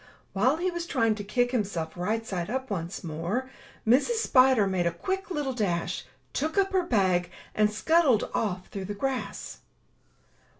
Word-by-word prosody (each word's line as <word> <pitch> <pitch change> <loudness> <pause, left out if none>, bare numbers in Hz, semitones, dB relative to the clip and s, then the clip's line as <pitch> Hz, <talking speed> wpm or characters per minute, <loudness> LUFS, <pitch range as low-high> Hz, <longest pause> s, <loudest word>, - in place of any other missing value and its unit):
While 255 +10 +3
he 365 +2 0
was 345 -1 -4
trying 230 -8 +2
to 210 -1 -6
kick 245 +4 +1
himself 190 -9 -2
right 215 +6 -1
side 180 -3 -3
up 260 0 -3
once 175 -1 -4
more, 175 +11 -3 0.4
Mrs. 280 - +4
Spider 255 - +5
made 185 -3 +1
a - - +1
quick 380 - -3
little 295 -6 -2
dash, 185 -8 -1 0.3
took 315 +6 -1
up 390 0 +2
her 375 - +4
bag, 185 - +2 0.2
and 215 0 +3
scuttled 280 0 +3
off 185 -4 -2
through 195 -2 -5
the 205 +2 -5
grass. 265 +4 -3
225 Hz, 165 wpm, -28 LUFS, 190-270 Hz, 0.4 s, Spider